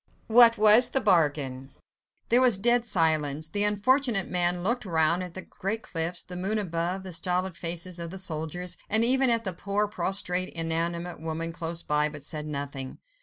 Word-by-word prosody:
"What 230 0 +6
was 215 +3 +5
the 270 - +1
bargain?" 145 - 0 0.5
There 240 +2 +5
was 245 -6 +4
dead 240 +3 +2
silence. 155 -4 +1
The 205 +3 +2
unfortunate 215 +1 +2
man 175 -1 0
looked 235 +6 0
round 170 -2 +1
at 180 -2 -8
the 185 - -6
great 215 +4 -5
cliffs, 165 +1 -2
the 180 - -9
moon 195 +4 -1
above, 180 -1 -3
the 185 -2 -7
stolid 180 +2 -1
faces 170 +2 -2
of 170 0 -4
the 190 - -7
soldiers, 175 0 -3
and 220 +2 +4
even 260 +1 +4
at 230 -1 +1
the 190 -3 -2
poor, 200 +4 -1
prostrate, 185 -3 -1
inanimate 170 +1 -3
woman 165 +1 -4
close 170 0 -4
by, 150 0 0
but 150 -2 -10
said 150 0 -3
nothing. 140 -2 -6
180 Hz, 175 wpm, -26 LUFS, 165-210 Hz, 0.5 s, What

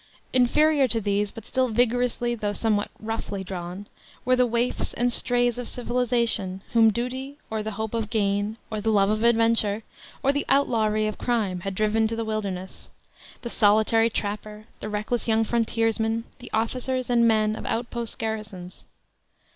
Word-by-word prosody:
Inferior 275 +3 +4
to 230 -1 0
these, 205 0 0
but 225 +1 -11
still 260 +1 +1
vigorously 240 +1 +1
though 210 -3 -2
somewhat 210 -1 0
roughly 215 -3 -4
drawn, 180 +1 -6 0.4
were 255 +1 +4
the 250 0 +3
waifs 235 +1 -1
and 245 0 +1
strays 245 0 +2
of 245 - -4
civilization, 235 -6 0
whom 225 -1 +6
duty, 255 +5 -4
or 220 -1 -1
the 215 0 -4
hope 220 +1 -4
of 225 -2 -2
gain, 205 0 0
or 215 -1 -2
the 220 - 0
love 205 -1 +3
of 215 +1 0
adventure, 225 -2 +3 0.4
or 275 - +4
the 285 - 0
outlawry 220 -6 +2
of 215 - -3
crime 215 -7 0
had 195 +2 -5
driven 215 +2 +2
to 225 - -3
the 225 0 -3
wilderness 200 -4 -4 0.5
the 235 - -4
solitary 220 +2 +4
trapper, 210 0 -4
the 210 - -5
reckless 210 +4 -2
young 225 0 +3
frontiersman, 225 0 0 0.2
the 245 - -9
officers 255 +3 -1
and 235 -1 +4
men 215 -1 +2
of - - -7
out 235 +1 -2
post 235 -2 -3
garrisons. 210 -5 -6
225 Hz, 165 wpm, -25 LUFS, 210-240 Hz, 0.5 s, whom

